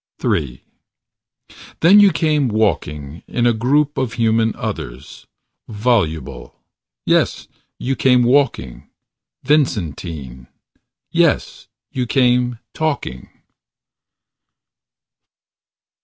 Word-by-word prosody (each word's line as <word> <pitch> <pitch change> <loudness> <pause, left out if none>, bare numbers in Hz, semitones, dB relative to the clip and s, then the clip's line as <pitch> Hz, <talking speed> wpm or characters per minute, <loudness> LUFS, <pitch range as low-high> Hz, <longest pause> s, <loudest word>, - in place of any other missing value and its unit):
III 65 -3 -1 1.2
Then 190 +6 +7
you 205 -2 +6
came 150 -2 +1
walking. 80 - -2
In 120 - -1
a 120 - +4
group 140 +6 +1
Of 130 -5 -2
human 115 -1 +1
others. 65 +4 -7 0.4
Voluble. 105 -8 -2 0.5
Yes: - - +1 0.3
you 135 +2 -2
came 125 -2 +3
walking, 120 - 0 0.5
Vincentine. 80 - -2 0.6
Yes: - - 0 0.2
you 125 -1 -2
came 125 -1 +2 0.2
talking. 140 - -3
120 Hz, 80 wpm, -19 LUFS, 80-135 Hz, 1.2 s, Then